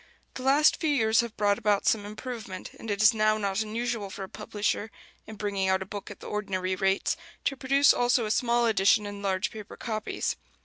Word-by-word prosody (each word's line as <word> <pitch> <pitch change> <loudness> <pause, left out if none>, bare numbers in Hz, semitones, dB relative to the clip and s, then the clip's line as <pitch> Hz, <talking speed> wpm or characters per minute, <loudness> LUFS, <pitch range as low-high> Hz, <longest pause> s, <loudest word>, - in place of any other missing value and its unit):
The - - -7
last 280 +4 +4
few 320 - -1
years 225 -6 +3
have 235 -2 -1
brought 205 0 +2
about 210 -3 +1
some 205 -2 +2
improvement; 215 -3 -7
and 225 - -8
it 205 +1 0
is 215 - +7
now 215 0 +2
not 200 0 -1
unusual 220 -1 -3
for 195 0 -7
a - - -6
publisher, 210 0 -2 0.4
in 220 - -8
bringing 200 -2 -1
out 190 0 +2
a - - -13
book 205 +1 -7
at 205 - -11
the - - -8
ordinary 190 -3 -2
rates, 195 +1 +1 0.3
to 275 - 0
produce 275 +2 +4
also 245 -1 +2
a 210 - -2
small 240 +1 +2
edition 210 -1 +3
in 205 0 -6
large 190 -1 -1
paper 215 -2 -9
copies. 215 -3 -3
215 Hz, 210 wpm, -27 LUFS, 200-235 Hz, 0.4 s, is